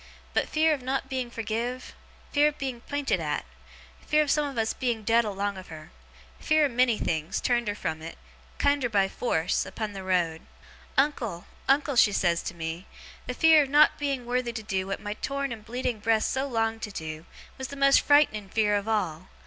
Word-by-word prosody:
But, - - 0
fear 315 0 +3
of 285 - -3
not 265 +1 -2
being 260 -3 -2
forgiv, 235 +2 -4 0.4
fear 290 +1 +4
of 300 - -2
being 260 -4 -4
pinted 285 +2 -1
at, - - -2 0.6
fear 305 0 +4
of 290 - -1
some 300 -1 +2
of 275 -3 -7
us 225 0 +1
being 240 -4 -2
dead 230 +2 +3
along 200 -1 -2
of 185 - -12
her, 155 +1 -11 0.5
fear 310 -1 +3
of 280 - -1
many 240 -2 +3
things, 160 +3 -2
turned 240 -2 +1
her 205 - -1
from 160 -5 -4
it, 165 +1 -8 0.4
kiender 285 -3 +2
by 195 -2 +3
force, 180 -6 0
upon 215 -2 -5
the 195 - -6
road: 175 -4 0 0.6
"Uncle, 245 - 0 0.2
uncle," 280 0 +3
she 215 -3 +6
says 170 -3 +1
to 175 - -6
me, 165 +2 -5 0.4
"the 250 - -3
fear 320 +1 +6
of 280 - -2
not 295 +2 +5
being 275 -4 -2
worthy 245 0 -1
to 220 -1 -5
do 190 -3 -2
what 195 - -3
my 205 - -4
torn 275 +4 -3
and 220 -2 -7
bleeding 245 -1 -2
breast 220 +1 +1
so 265 +1 -1
longed 225 -3 -1
to 210 - -4
do, 160 -2 -7 0.3
was 265 - -4
the 280 - -8
most 275 0 +5
fright'ning 250 -9 +3
fear 210 0 +2
of 205 +1 -2
all! 185 -6 -1
230 Hz, 205 wpm, -27 LUFS, 200-275 Hz, 0.6 s, she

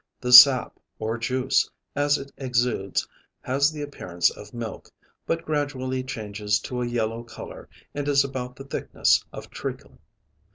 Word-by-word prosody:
The 125 0 -1
sap, 130 0 +9 0.2
or 110 +2 -3
juice, 130 +3 +1 0.3
as 145 0 +2
it 140 0 -9
exudes 120 -7 -1 0.3
has 140 +4 +1
the 150 -1 -6
appearance 90 -12 -1
of 105 0 -12
milk, 115 -2 -7 0.4
but 165 0 -2
gradually 130 -4 -2
changes 105 -4 -2
to 125 -1 -4
a 120 - -1
yellow 115 -1 -2
color 120 - -11 0.2
and 145 0 -4
is 140 -1 +4
about 130 -2 -5
the 135 - -10
thickness 135 - +1
of - - -10
treacle. - - -7
125 Hz, 150 wpm, -25 LUFS, 115-140 Hz, 0.4 s, sap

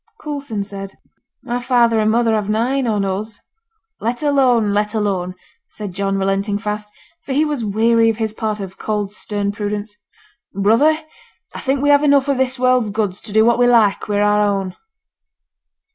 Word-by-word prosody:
Coulson 280 -9 -4
said 195 -1 -8 0.5
'My 245 -1 -3
father 240 -3 +3
and 215 0 +2
mother 230 0 +2
have 210 -2 -1
nine 245 +5 0
on 210 -3 0
us.' 205 +3 -4 0.6
'Let 240 +6 -3
alone, 250 -7 +3
let 210 +2 0
alone!' 190 -4 -1 0.3
said 205 -4 -7
John, 195 +1 -1
relenting 195 +1 0
fast; 210 +1 -4 0.3
for 270 - -4
he 300 +3 +2
was 295 -6 -2
weary 225 +2 +3
of 225 - -1
his 220 -2 -2
part 215 -1 -3
of 190 -1 -8
cold, 210 -2 -2
stern 205 -1 -3
prudence. 205 0 -4 0.6
'Brother, 230 +11 +3 0.6
I - - -6
think 270 0 -1
we 290 - +3
have 285 0 +6
enough 280 -2 +4
of 280 -2 +1
this 260 0 0
world's 255 -3 +2
goods 205 -2 -2
to 215 - -10
do 220 +1 +4
what 235 +1 +3
we 245 - +5
like 225 -5 +3
wi' 205 -1 0
our 210 0 +3
own.' 195 -3 -1
215 Hz, 175 wpm, -19 LUFS, 205-245 Hz, 0.6 s, have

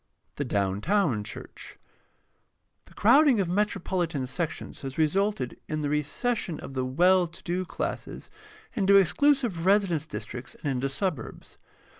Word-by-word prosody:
The 145 - -2
downtown 105 - +1
church. - - -9 0.6
— - - -47
The - - -19
crowding 265 +2 +5
of 190 - +1
metropolitan 180 -6 -1
sections 160 +5 -4
has 135 -1 -6
resulted 160 -3 0
in 155 0 -2
the 145 - -1
recession 165 - -1
of - - -8
the 130 -1 -1
well 175 +8 +3
to 170 - -13
do 180 +2 -2
classes - - -5 0.4
into 200 -4 +3
exclusive 235 - +3
residence 190 -6 +2
districts 120 -1 -7
and 145 - 0
into 135 +1 -1
suburbs. 135 - -4
170 Hz, 135 wpm, -27 LUFS, 135-200 Hz, 0.6 s, crowding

